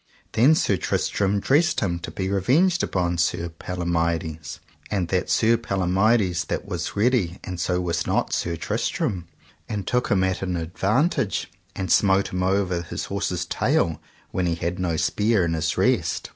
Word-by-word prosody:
Then 130 Hz, +8 st, +5 dB
Sir 100 Hz, -9 st, +1 dB
Tristram 100 Hz, +4 st, 0 dB
dressed 155 Hz, -, +2 dB
him 85 Hz, -5 st, -1 dB
to 85 Hz, -, -6 dB
be 95 Hz, -, -3 dB
revenged 140 Hz, -, +2 dB
upon 85 Hz, -2 st, -1 dB
Sir 85 Hz, 0 st, 0 dB
Palomides, 85 Hz, -3 st, -3 dB, 0.3 s
and 95 Hz, -5 st, -1 dB
that 90 Hz, -1 st, 0 dB
saw -, -, +2 dB
Sir 115 Hz, +1 st, +4 dB
Palomides 95 Hz, -2 st, +1 dB
that -, -, -3 dB
was -, -, -4 dB
ready 105 Hz, -5 st, +1 dB
and 90 Hz, -2 st, -6 dB
so 90 Hz, +1 st, 0 dB
was 90 Hz, -1 st, -1 dB
not -, -, 0 dB
Sir 85 Hz, 0 st, -1 dB
Tristram, 85 Hz, +2 st, -2 dB, 0.4 s
and 100 Hz, -3 st, -3 dB
took 125 Hz, +5 st, 0 dB
him 95 Hz, -2 st, +3 dB
at 95 Hz, 0 st, 0 dB
an 90 Hz, -2 st, -2 dB
advantage 105 Hz, -, 0 dB, 0.2 s
and 95 Hz, -3 st, -3 dB
smote 95 Hz, -1 st, +4 dB
him 90 Hz, -, -1 dB
over 95 Hz, -2 st, +1 dB
his 85 Hz, -, -5 dB
horse's 95 Hz, -3 st, -2 dB
tail 80 Hz, -2 st, 0 dB, 0.3 s
when 90 Hz, -1 st, 0 dB
he 85 Hz, -, 0 dB
had 85 Hz, +2 st, -3 dB
no 85 Hz, -3 st, 0 dB
spear 105 Hz, +5 st, +2 dB
in 85 Hz, -, -1 dB
his 80 Hz, -1 st, -1 dB
rest. -, -, +1 dB
95 Hz, 170 wpm, -24 LUFS, 85-105 Hz, 0.4 s, Then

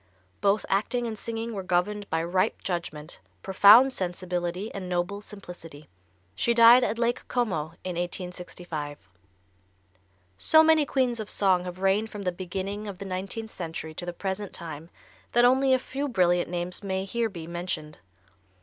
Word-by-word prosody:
Both 200 Hz, +1 st, +2 dB
acting 225 Hz, +5 st, 0 dB
and 225 Hz, -2 st, -3 dB
singing 230 Hz, +1 st, -5 dB
were 200 Hz, -, -3 dB
governed 190 Hz, +3 st, -1 dB
by 160 Hz, 0 st, 0 dB
ripe 185 Hz, +2 st, 0 dB
judgment, 170 Hz, -4 st, -4 dB, 0.2 s
profound 215 Hz, +7 st, +7 dB
sensibility 180 Hz, +1 st, -3 dB
and 185 Hz, -2 st, -6 dB
noble 180 Hz, +3 st, -2 dB
simplicity. 175 Hz, -7 st, -10 dB, 0.4 s
She 235 Hz, -, +1 dB
died 235 Hz, +2 st, +8 dB
at 225 Hz, -, 0 dB
Lake 240 Hz, +1 st, -1 dB
Como 170 Hz, -10 st, -1 dB
in 185 Hz, -1 st, -4 dB
1865. 175 Hz, -4 st, -5 dB, 1.4 s
So 315 Hz, 0 st, +6 dB
many 315 Hz, -2 st, +4 dB
queens 250 Hz, -4 st, 0 dB
of 215 Hz, -, -5 dB
song 185 Hz, -3 st, +2 dB
have 180 Hz, 0 st, -6 dB
reigned 195 Hz, +3 st, +1 dB
from 205 Hz, -2 st, -7 dB
the 180 Hz, -, 0 dB
beginning 190 Hz, +3 st, -5 dB
of 200 Hz, -2 st, -6 dB
the 200 Hz, -, -7 dB
nineteenth 195 Hz, +4 st, -4 dB
century 160 Hz, -2 st, -6 dB
to 175 Hz, -, -6 dB
the -, -, -1 dB
present 190 Hz, +2 st, -4 dB
time 160 Hz, -1 st, -7 dB, 0.4 s
that 240 Hz, 0 st, +6 dB
only 265 Hz, +2 st, +4 dB
a 260 Hz, -, +6 dB
few 275 Hz, +2 st, -4 dB
brilliant 180 Hz, -8 st, +2 dB
names 175 Hz, +1 st, -3 dB
may 190 Hz, -1 st, -2 dB
here 230 Hz, +3 st, -1 dB
be 170 Hz, -5 st, -8 dB
mentioned. 170 Hz, -3 st, -5 dB
190 Hz, 160 wpm, -27 LUFS, 175-225 Hz, 1.4 s, died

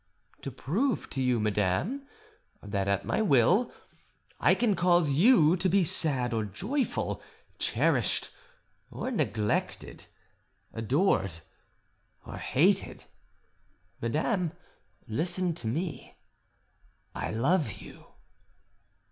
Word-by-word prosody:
"To -, -, -4 dB
prove 230 Hz, -, -1 dB
to 135 Hz, -, -2 dB
you, 125 Hz, -2 st, +2 dB
madame, 105 Hz, -, 0 dB, 0.6 s
that 100 Hz, -1 st, -2 dB
at 100 Hz, 0 st, 0 dB
my -, -, 0 dB
will 185 Hz, -, +3 dB, 0.7 s
I -, -, +4 dB
can 225 Hz, -5 st, +2 dB
cause 175 Hz, -3 st, +3 dB
you 170 Hz, -, +5 dB
to 185 Hz, +1 st, +1 dB
be 195 Hz, +1 st, +4 dB
sad 135 Hz, -7 st, 0 dB
or 110 Hz, -1 st, 0 dB
joyful, 215 Hz, -, -2 dB, 0.4 s
cherished -, -, +1 dB, 0.6 s
or 260 Hz, -, -4 dB
neglected, 110 Hz, -, -2 dB, 0.7 s
adored 115 Hz, -, +1 dB, 0.9 s
or -, -, -8 dB
hated. -, -, +1 dB, 1.0 s
Madame, 165 Hz, -, 0 dB, 0.5 s
listen 175 Hz, +8 st, -1 dB
to 155 Hz, -, -6 dB
me: 160 Hz, +8 st, -4 dB, 1.0 s
I -, -, -4 dB
love 135 Hz, -, +1 dB
you." 100 Hz, -, -13 dB
155 Hz, 95 wpm, -29 LUFS, -, 1.0 s, you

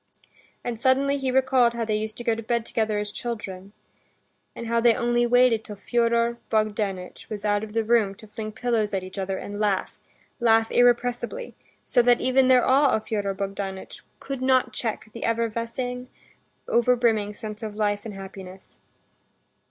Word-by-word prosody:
And 235 Hz, -2 st, -4 dB
suddenly 275 Hz, +3 st, +2 dB
he 265 Hz, -1 st, -1 dB
recalled 255 Hz, -2 st, +3 dB
how 230 Hz, -1 st, -1 dB
they 215 Hz, -, -1 dB
used 215 Hz, 0 st, -4 dB
to 240 Hz, -, -6 dB
go 230 Hz, -, +2 dB
to 225 Hz, -, -4 dB
bed 235 Hz, +1 st, -1 dB
together 220 Hz, -2 st, -1 dB
as 205 Hz, 0 st, -3 dB
children, 200 Hz, -5 st, -6 dB, 0.8 s
and 235 Hz, -, -6 dB
how 230 Hz, 0 st, +1 dB
they 235 Hz, -1 st, +5 dB
only 240 Hz, 0 st, +1 dB
waited 245 Hz, -2 st, +4 dB
till 210 Hz, -, -8 dB
Fyodor 235 Hz, +2 st, +1 dB
Bogdanitch 205 Hz, -4 st, -2 dB
was 210 Hz, -1 st, -5 dB
out 205 Hz, 0 st, +1 dB
of 215 Hz, -1 st, -7 dB
the 225 Hz, 0 st, +1 dB
room 220 Hz, -3 st, +2 dB
to 220 Hz, -, -14 dB
fling 215 Hz, 0 st, -6 dB
pillows 225 Hz, -3 st, 0 dB
at 190 Hz, -, -2 dB
each 185 Hz, +2 st, -8 dB
other 190 Hz, 0 st, -2 dB
and 205 Hz, +1 st, -6 dB
laugh, 205 Hz, -3 st, -1 dB, 0.4 s
laugh 225 Hz, -2 st, +3 dB
irrepressibly, 245 Hz, -, +1 dB, 0.3 s
so 245 Hz, -, +3 dB
that 240 Hz, 0 st, +4 dB
even 260 Hz, 0 st, +3 dB
their 255 Hz, -1 st, +5 dB
awe 275 Hz, +1 st, +4 dB
of 220 Hz, -, -3 dB
Fyodor 200 Hz, -3 st, -1 dB
Bogdanitch 195 Hz, -1 st, -5 dB, 0.2 s
could 275 Hz, -2 st, -5 dB
not 260 Hz, -1 st, +2 dB
check 225 Hz, -3 st, -3 dB
the 230 Hz, -, -7 dB
effervescing, 230 Hz, +2 st, -2 dB, 0.6 s
overbrimming 230 Hz, -3 st, +2 dB
sense 215 Hz, -1 st, -7 dB
of 215 Hz, -2 st, -5 dB
life 205 Hz, -1 st, 0 dB
and 215 Hz, -3 st, -7 dB
happiness. 190 Hz, -1 st, -11 dB
225 Hz, 170 wpm, -25 LUFS, 210-240 Hz, 0.8 s, they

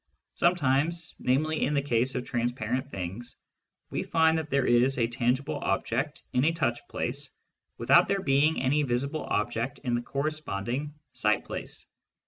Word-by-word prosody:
Sometimes, 165 Hz, 0 st, +1 dB
namely 150 Hz, +5 st, +1 dB
in 150 Hz, -, +1 dB
the 140 Hz, -, +3 dB
case 125 Hz, -1 st, +1 dB
of 125 Hz, -1 st, -2 dB
transparent 120 Hz, +2 st, -2 dB
things, 95 Hz, +4 st, -6 dB, 0.6 s
we -, -, -1 dB
find 160 Hz, 0 st, +3 dB
that 155 Hz, -2 st, -6 dB
there 140 Hz, -2 st, +2 dB
is 125 Hz, +3 st, +4 dB
a 115 Hz, -, +3 dB
tangible 125 Hz, +3 st, 0 dB
object -, -, -1 dB
in 125 Hz, -, +3 dB
a 165 Hz, -, +4 dB
touch 130 Hz, -8 st, 0 dB
place -, -, -2 dB, 0.5 s
without -, -, +5 dB
there 195 Hz, -1 st, 0 dB
being 145 Hz, +3 st, +3 dB
any 140 Hz, +3 st, +3 dB
visible 140 Hz, +3 st, -1 dB
object 115 Hz, +5 st, -1 dB
in 125 Hz, -3 st, -1 dB
the 120 Hz, -, +1 dB
corresponding 140 Hz, -1 st, -3 dB, 0.2 s
sight 105 Hz, 0 st, +1 dB
place. -, -, -6 dB
130 Hz, 150 wpm, -28 LUFS, 120-150 Hz, 0.6 s, without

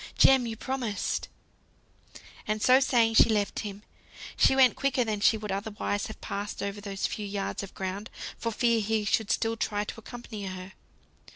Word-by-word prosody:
Jem, 265 Hz, -3 st, +6 dB
you 225 Hz, -1 st, -5 dB
promised 240 Hz, -5 st, -2 dB, 0.6 s
" -, -, -19 dB
And 215 Hz, 0 st, 0 dB
so 255 Hz, +4 st, +6 dB
saying 235 Hz, -4 st, +3 dB
she 225 Hz, -, +6 dB
left 210 Hz, -2 st, 0 dB
him. 205 Hz, -1 st, -6 dB, 0.5 s
She 265 Hz, -, +4 dB
went 260 Hz, -2 st, +6 dB
quicker 270 Hz, -2 st, +1 dB
than 215 Hz, -2 st, -2 dB
she 220 Hz, +2 st, +4 dB
would 210 Hz, -2 st, -5 dB
otherwise 205 Hz, 0 st, -2 dB
have 220 Hz, -, -9 dB
passed 200 Hz, 0 st, -4 dB
over 200 Hz, +1 st, -4 dB
those 195 Hz, -1 st, -3 dB
few 210 Hz, -1 st, -3 dB
yards 200 Hz, 0 st, -3 dB
of 200 Hz, -, -9 dB
ground, 195 Hz, +3 st, -4 dB, 0.3 s
for 230 Hz, -, -3 dB
fear 235 Hz, 0 st, +2 dB
he 215 Hz, 0 st, 0 dB
should 210 Hz, +1 st, +1 dB
still 225 Hz, 0 st, +1 dB
try 210 Hz, -2 st, -1 dB
to 220 Hz, -, -7 dB
accompany 225 Hz, -3 st, -8 dB
her. 185 Hz, 0 st, -7 dB
215 Hz, 180 wpm, -28 LUFS, 200-230 Hz, 0.6 s, Jem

